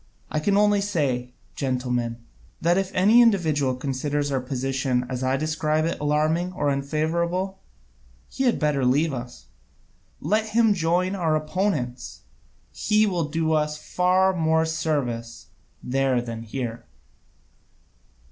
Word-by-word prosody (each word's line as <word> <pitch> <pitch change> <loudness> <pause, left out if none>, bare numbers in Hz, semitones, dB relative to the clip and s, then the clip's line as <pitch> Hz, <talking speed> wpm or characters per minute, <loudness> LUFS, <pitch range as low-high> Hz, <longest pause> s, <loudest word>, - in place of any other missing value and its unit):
I 155 - 0
can 200 +6 +1
only 205 -1 +4
say, 130 -10 -1 0.2
gentlemen, 125 -3 -2 0.4
that 170 +2 +2
if 195 0 0
any 210 +6 +6
individual 155 - +2
considers 140 +2 -2
our 135 -2 0
position 130 -1 -1
as 130 -1 -4
I 130 +1 +1
describe 155 +1 0
it 165 - -2
alarming 155 +4 0
or 145 -5 0
unfavourable, 170 +7 -1 0.7
he 265 - -2
had 245 - +3
better 150 -3 0
leave 140 +5 +2
us. 120 - -7 0.7
Let 215 +1 0
him 225 -2 +5
join 180 +1 0
our 165 -5 +1
opponents, 155 -6 -2 0.5
he 215 0 +2
will 180 -6 0
do 160 +1 0
us 150 -1 0
far 185 +4 +2
more 160 -1 +2
service 140 -8 -3 0.3
there 135 0 +1
than 115 -1 -5
here." 115 +1 -5
155 Hz, 130 wpm, -24 LUFS, 130-180 Hz, 0.7 s, any